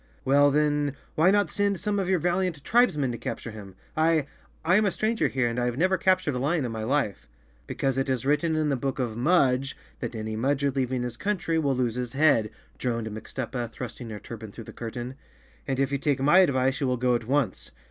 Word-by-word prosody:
"Well 145 +2 +5
then, 145 -1 +1 0.2
why 165 +4 +4
not 205 +1 +2
send 200 -2 0
some 205 -1 -1
of 190 -1 -1
your 190 - +3
valiant 175 -2 -1
tribes¬ 240 -8 +3
men 135 -4 0
to 120 - -6
capture 115 0 -5
him? 100 -3 -10 0.2
I, 160 -2 +3 0.4
I 175 +4 +5
am 215 - +3
a - - +3
stranger 220 +4 0
here 130 -2 0
and 120 +1 -2
have 120 0 -1
never 185 +4 +3
captured 185 -4 +2
a 125 - -2
lion 150 +2 0
in 120 - -3
my 110 -1 -4
life." 115 -4 -1 0.2
" - - -33
Because 135 -1 -1
it 135 - -1
is 130 -2 -1
written 150 +3 +2
in 155 -1 +1
the 140 - +2
book 135 +1 -2
of 120 -4 -2
Mudge 135 -1 +2 0.2
that 120 -2 -5
any 110 0 -4
Mudger 140 +3 0
leaving 130 -2 0
his 120 -1 -5
country 190 -5 -1
will 140 -4 +1
lose 125 -2 0
his 125 0 -4
head," 135 -7 +3 0.3
droned 115 -3 -2
Mixtuppa, 120 +2 -5
thrusting 120 -1 -7
her 105 - -6
turban 110 +1 -9
through 115 - -9
the - - -11
curtain. 120 +2 -6 0.5
"And 135 -2 -1
if 135 0 +1
you 140 - 0
take 145 -2 +1
my 150 +7 +5
advice 135 -6 +2
you 135 - +1
will 125 0 +1
go 125 +1 +2
at 120 -2 -1
once. 140 -1 0
135 Hz, 230 wpm, -26 LUFS, 120-155 Hz, 0.5 s, Well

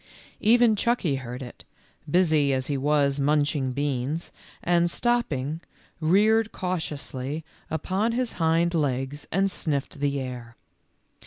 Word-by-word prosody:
Even 230 0 +5
Chucky 200 - +1
heard 125 0 -6
it, 120 - -11 0.5
busy 155 -5 +3
as 130 0 -1
he 145 - -1
was 140 0 +2
munching 145 -1 +1
beans, 140 +3 -2 0.3
and 175 0 +3
stopping, 165 - -1 0.4
reared 210 +7 +3
cautiously 155 -4 -4 0.2
upon 190 +8 -1
his 245 -1 -1
hind 165 +2 +2
legs 140 -2 -1
and 195 +2 +2
sniffed 145 -3 -2
the 140 -1 0
air. 125 -3 -7
150 Hz, 115 wpm, -26 LUFS, 135-180 Hz, 0.5 s, Even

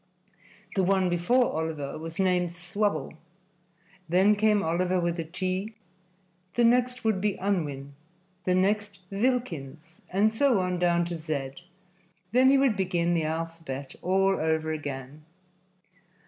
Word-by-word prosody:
The 195 - +3
one 190 0 +2
before 180 +9 +2
Oliver 160 -3 -3
was 165 +1 -7
named 180 -2 +2
Swubble; 175 -2 -2 1.0
then 190 +5 +4
came 210 -1 +3
Oliver 180 +3 +1
with 170 0 -1
a - - -1
T; 185 +5 -3 0.8
the 240 - +3
next 250 +1 +2
would 215 -4 +1
be 210 -1 +1
Unwin, 150 -8 -2 0.5
the 180 - +2
next 200 +1 0
Vilkins, 170 - -2
and 205 +4 +2
so 250 -2 +3
on 180 -1 -1
down 175 -1 +2
to 175 0 -4
Z. 155 -5 -3 0.8
Then 255 +3 +5
he 275 - +5
would 270 -5 +3
begin 175 -3 0
the 165 -2 +1
alphabet 160 -4 -5
all 195 +1 +2
over 160 0 0
again. 145 -1 -6
180 Hz, 135 wpm, -27 LUFS, 160-205 Hz, 1.0 s, Then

